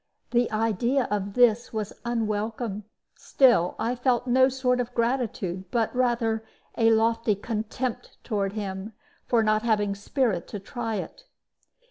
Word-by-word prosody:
The 240 0 +2
idea 225 +4 +1
of 200 -1 -2
this 240 -2 +4
was 215 -2 -3
unwelcome; 220 -2 -2 0.3
still, 240 -10 +3
I 235 - -1
felt 245 -1 +1
no 260 +1 +4
sort 255 -1 0
of 245 0 -3
gratitude, 230 -7 -1
but 230 +2 0
rather 235 -3 +1 0.3
a 225 -1 +4
lofty 225 -1 +2
contempt 225 +4 -4
toward 200 -4 -1
him 200 0 -5 0.3
for 230 -2 +3
not 215 0 +2
having 210 -3 +1
spirit 205 -1 -1
to 205 - -6
try 225 +2 -4
it. 355 - -6
225 Hz, 135 wpm, -26 LUFS, 210-245 Hz, 0.3 s, this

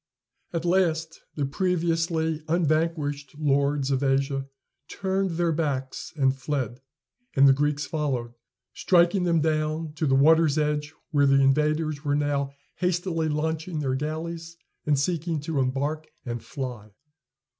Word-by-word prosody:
At 170 -1 -3
last 165 -3 +1
the 145 - 0
previously 165 0 0
unvanquished 155 -3 0
lords 140 -1 +1
of 135 -1 +1
Asia 135 0 0 0.4
turned 190 -3 -1
their 170 -1 +2
backs 140 -5 -2
and 135 -3 +2
fled, 130 -3 -3 0.5
and 140 0 +7
the 135 - +7
Greeks 145 +1 0
followed, 130 -7 -2 0.4
striking 180 +1 +3
them 165 -2 +3
down, 155 0 -1
to 155 - 0
the 135 - +3
water's 155 +1 +5
edge, 150 0 0 0.2
where 145 -2 +4
the 135 0 +5
invaders 150 +2 +2
were 145 -1 +1
now 145 -1 0 0.3
hastily 175 -3 0
launching 160 +2 -2
their 135 -3 -1
galleys, 165 +4 -4 0.3
and 145 -1 +3
seeking 165 +2 -1
to 150 -1 -2
embark 140 +4 -1 0.2
and 120 -2 -4
fly. 125 -6 -6
150 Hz, 135 wpm, -26 LUFS, 140-165 Hz, 0.5 s, and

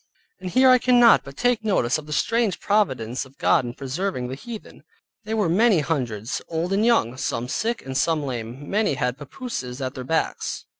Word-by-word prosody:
And 185 -1 -5
here 255 +6 +5
I 255 - +6
cannot 245 -2 +5
but 140 0 -12
take 245 -2 +1
notice 155 - +1
of 150 - -12
the - - -9
strange 225 +6 +1
providence 130 - 0
of 135 0 -17
God - - +3
in 120 0 -6
preserving 135 -1 -3
the - - -5
heathen. 225 - -10 0.4
They 220 +1 -2
were 210 -5 +1
many 195 +1 +4
hundreds, 125 -7 -2
old 170 +3 -2
and 200 +2 +2
young, 225 - +2
some 120 -2 -2
sick, 230 - -2
and 135 0 -6
some 160 +1 +1
lame; 125 +1 -6
many 205 -7 +1
had 125 +1 -2
papooses 140 - -6
at 130 -1 -3
their 130 - -6
backs. 160 +6 -2
155 Hz, 195 wpm, -23 LUFS, 130-215 Hz, 0.4 s, I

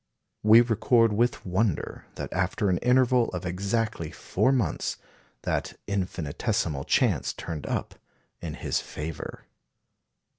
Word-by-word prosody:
We 110 +2 +8
record 115 -1 +3
with 120 +4 +1
wonder 95 -1 -1
that, - - -5
after 100 -2 +1
an 90 - +1
interval 125 -1 +4
of 90 - -4
exactly 100 -1 -1
four 130 - 0
months, 125 -7 0 0.5
that - - -2
infinitesimal 90 - -1
chance - - +2
turned 80 -3 -6
up - - -2 0.5
in 80 -3 -5
his - - -1
favour. 75 0 -7
100 Hz, 115 wpm, -27 LUFS, 85-115 Hz, 0.5 s, We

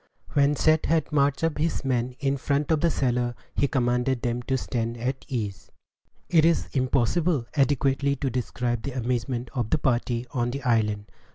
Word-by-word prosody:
When 145 0 +3
Seth 155 +1 +3
had 160 -1 +1
marched 140 -1 +2 0.2
his 160 -2 -1
men 125 -1 0
up - - -26
in 140 0 +1
front 145 +3 0
of 155 -2 +2
the 170 - +3
cellar, 120 -4 0 0.2
he 140 - +2
commanded 125 -1 0
them 120 0 -1
to 130 +2 -1
stand 115 -2 -3
at 130 +3 -3
ease. 105 -9 -4 0.6
It 165 -3 +4
is 165 +1 +2
impossible 135 +3 +1
adequately 140 -1 +2
to 135 -1 -2
describe 120 0 -2
the 135 +4 -5
amazement 125 0 -2
of 120 -4 -2
the - - +3
party 120 -3 0
on 120 -3 0
the 135 +2 -5
island. 105 -4 +1
130 Hz, 175 wpm, -26 LUFS, 120-140 Hz, 0.6 s, It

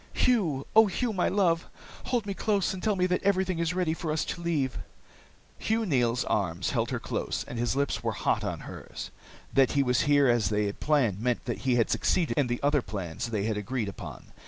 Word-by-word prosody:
"Hugh! 170 - +1
Oh, 220 0 +8
Hugh, 225 +4 -1
my 185 - +1
love, 175 -4 +1 0.4
hold 240 -4 0
me 200 - -2
close 200 -2 0
and 185 - -6
tell 215 -2 +1
me 180 -1 +2
that 180 0 0
everything 190 -3 +1
is 170 +1 0
ready 180 -3 +1
for 165 -1 -3
us 155 - 0
to 170 - -5
leave!" 150 -7 -1 0.8
Hugh 225 +1 0
Neils' 125 - +1
arms 90 -3 -1
held - - 0
her - - -2
close, - - -3
and 120 - -5
his 120 +2 0
lips 140 -6 0
were 115 -1 -1
hot - - 0
on - - -3
hers. - - -8 0.4
That 135 -2 +4
he 140 -1 +3
was 125 -1 +2
here 145 -1 +5
as 120 -3 +3
they 105 -1 +1
had 100 - -4
planned 125 -10 +1
meant 125 0 0
that 120 - -3
he 125 - +4
had 115 -2 +2
succeeded 175 -3 +1
in 145 -4 +2
the 120 0 -2
other 145 0 +3
plans 95 -3 -5
they 105 -3 -1
had 110 0 -1
agreed 110 +1 -2
upon. 90 - -10
140 Hz, 220 wpm, -28 LUFS, 115-180 Hz, 0.8 s, Oh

